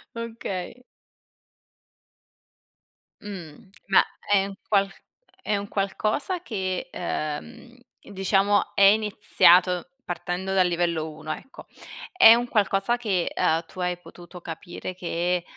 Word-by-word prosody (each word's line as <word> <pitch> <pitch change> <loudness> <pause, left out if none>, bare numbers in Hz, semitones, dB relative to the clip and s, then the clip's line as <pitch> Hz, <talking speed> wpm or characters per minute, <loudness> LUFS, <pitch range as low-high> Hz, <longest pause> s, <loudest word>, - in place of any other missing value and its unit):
Okay. 230 -1 -6 2.4
Mh. 190 -1 -10 0.2
Ma 195 - +6 0.3
è 195 -1 +4
un 195 -1 -7
qual 200 -2 +2 0.5
è 210 -1 0
un 200 0 -5
qualcosa 215 - -1
che, 190 - -3
ehm, 230 +10 -5 0.3
diciamo 195 +1 +1
è - - +1
iniziato 195 -4 +4 0.2
partendo 180 +2 -3
dal 185 -2 +4
livello 170 -2 -1
1, 155 0 -6
ecco. 270 - -12 0.5
È 230 -12 +9
un 240 +1 -1
qualcosa 205 +1 +1
che, 195 -7 -1
ehm, 165 +1 +1
tu 185 - -13
hai 180 -1 -1
potuto 175 0 -13
capire 175 +2 -7
che, 175 0 -1
190 Hz, 110 wpm, -25 LUFS, 175-210 Hz, 2.4 s, È